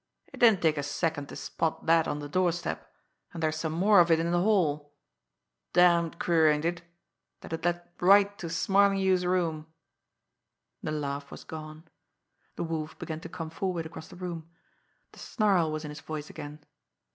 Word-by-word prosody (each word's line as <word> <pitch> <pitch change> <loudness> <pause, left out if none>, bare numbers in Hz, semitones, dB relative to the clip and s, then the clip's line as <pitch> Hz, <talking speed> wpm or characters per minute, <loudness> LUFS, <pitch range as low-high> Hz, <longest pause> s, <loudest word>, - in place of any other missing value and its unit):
It - - -10
didn't 220 -7 +5
take 155 -2 +2
a - - 0
second 145 0 -2
to - - -8
spot 160 -1 -3
that 165 -1 +4
on 145 - -2
the 145 0 -6
doorstep, 175 +1 -1 0.4
and 165 - -6
there's 155 0 0
some 155 0 -3
more 195 +4 +5
of 175 -1 +5
it 165 -1 +4
in 170 +1 0
the 175 0 +2
hall. 150 -8 +1 0.8
Damned 170 -2 +4
queer, 165 -3 +3
ain't 150 +1 +1
it 170 0 -1 0.6
that - - -8
it 165 - -4
led 175 0 -1
right 200 +2 +5
to 170 - -5
Smarlinghue's 190 +1 +2
room!" 160 -4 -1 1.1
The - - -3
laugh 140 -2 -4
was - - -10
gone. 155 0 -9 0.7
The - - -3
Wolf 160 -2 -4
began 160 -1 -5
to - - -9
come 160 -2 -6
forward 175 -1 -3
across 160 0 -9
the - - -13
room. 170 -3 -6 0.6
The - - -16
snarl 195 -8 +1
was 155 0 -4
in 150 - -6
his 150 -1 -9
voice 155 -1 -6
again. 150 -1 -9
165 Hz, 180 wpm, -28 LUFS, 155-180 Hz, 1.1 s, didn't